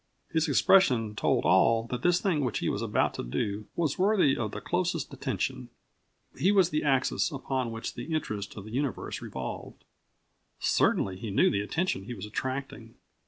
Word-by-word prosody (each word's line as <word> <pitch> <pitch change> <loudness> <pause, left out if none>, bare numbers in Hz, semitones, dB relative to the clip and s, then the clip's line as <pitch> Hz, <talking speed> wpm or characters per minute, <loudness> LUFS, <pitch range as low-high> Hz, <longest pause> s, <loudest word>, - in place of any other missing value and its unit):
His 160 0 +1
expression 130 - +4
told - - +1
all 115 0 +4
that 125 -1 -2
this 175 +3 +3
thing 165 -7 0
which 120 -5 -1
he - - -1
was - - -2
about - - +1
to - - -5
do 100 - -3
was 160 -3 -1
worthy 190 -8 +4
of 110 -3 -2
the - - -6
closest 180 +1 -2
attention. - - -3 0.7
He 195 - +2
was 190 -4 +4
the 150 - 0
axis 135 +3 +1
upon 130 -3 -2
which 115 0 -5
the 120 +7 -7
interest 110 -12 -3
of 100 - -7
the 110 - -9
universe 135 +2 -3
revolved. - - -7 0.8
Certainly 95 -1 +2
he 110 +3 -6
knew 100 - +3
of - - -2
the 100 - +1
attention 105 - -1
he 120 - -6
was 100 -1 -7
attracting. 130 0 -5
130 Hz, 180 wpm, -28 LUFS, 110-160 Hz, 0.8 s, expression